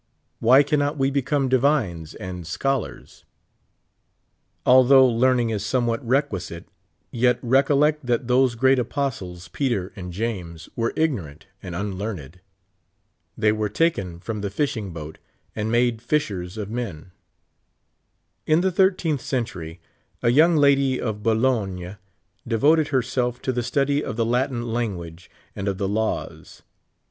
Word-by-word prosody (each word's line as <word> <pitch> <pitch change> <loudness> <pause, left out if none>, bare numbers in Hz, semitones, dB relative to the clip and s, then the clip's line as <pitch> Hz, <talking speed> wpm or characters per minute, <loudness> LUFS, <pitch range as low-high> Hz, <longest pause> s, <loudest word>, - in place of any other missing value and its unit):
Wiiy 130 +5 +6
cannot 145 0 0
we 135 0 +1
become 140 0 0
divines 125 - +1
and 90 -3 -7
scholars? 135 +8 -3 1.4
Although 130 +1 +7
learn 125 +1 +3
ing 115 - -1
is 105 -2 -2
somewhat 120 +3 0
requisite, 115 - -2 0.4
yet 125 0 +2
recollect 140 +4 +3
that 120 0 0
tliose 125 -1 +2
great 130 +2 +4
apostles, 115 - -3
Peter 115 -9 -2
and 90 -2 -7
James, 90 -5 -4
were 115 0 0
ignorant 100 - -2 0.2
and 90 -3 -7
unlearned. 95 -4 -5 1.0
They 105 - +3
were 110 -1 -1
taken 100 - 0
from 105 +3 -5
tlie 100 -1 -3
fishing 110 -5 -2
boat, 80 -1 -8 0.4
and 110 +1 -2
ma<le 120 -1 +2
fishers 105 -9 -2
of 105 -1 -5
men. 95 -9 -5 1.4
In 155 +2 +4
the 190 +1 +1
thirteenth 180 -6 +2
century, 110 - -4 0.4
a 120 - +4
young 160 +7 +5
lady 140 -3 +3
of 110 -3 -3
Bologne 105 -5 0 0.5
de 115 -1 0
voted 155 +5 +4
herself 125 -2 -1
to 130 - 0
the 125 -1 -1
study 140 +4 0
of - - -4
the 115 0 0
Latin 120 -1 -1
language 90 -7 -4 0.3
and 95 - -4
of 100 -1 -1
the 100 -1 -1
laws. 110 +2 -3
120 Hz, 135 wpm, -23 LUFS, 100-135 Hz, 1.4 s, Although